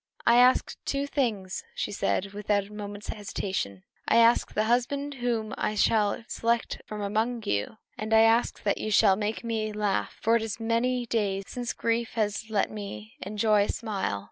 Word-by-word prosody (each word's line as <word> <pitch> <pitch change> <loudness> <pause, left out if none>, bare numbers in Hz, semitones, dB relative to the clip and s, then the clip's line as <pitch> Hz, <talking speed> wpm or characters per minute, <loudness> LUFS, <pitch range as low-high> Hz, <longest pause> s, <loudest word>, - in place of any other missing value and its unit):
"I 235 - +6
ask 250 +1 +4
two 280 0 -1
things," 225 - -2
she - - -2
said, 195 +1 -1
without 205 0 0
a 210 - -14
moment's 205 0 -7
hesitation: 190 - -3 0.2
"I - - +3
ask 230 +1 +5
the 215 - +2
husband 265 +5 0
whom 235 -4 -2
I 215 - 0
shall 210 +1 +2
select 235 0 -1
from 210 -1 -5
among 220 +3 -1
you; 105 - -1 0.2
and 215 +1 -4
I 220 0 +7
ask 225 +1 +3
that 200 - +1
you 215 - -3
shall 205 -2 +5
make 210 +3 -3
me 220 -2 -2
laugh, 210 -1 -1
for 225 +1 +3
it - - -3
is 220 0 -4
many 240 +2 0
days 205 -4 0
since 245 +2 -4
grief 230 0 -1
has 215 0 -1
let 210 -2 +1
me 110 - -7
enjoy 210 +1 +2
a - - -8
smile." 200 - -2
215 Hz, 180 wpm, -27 LUFS, 205-235 Hz, 0.2 s, I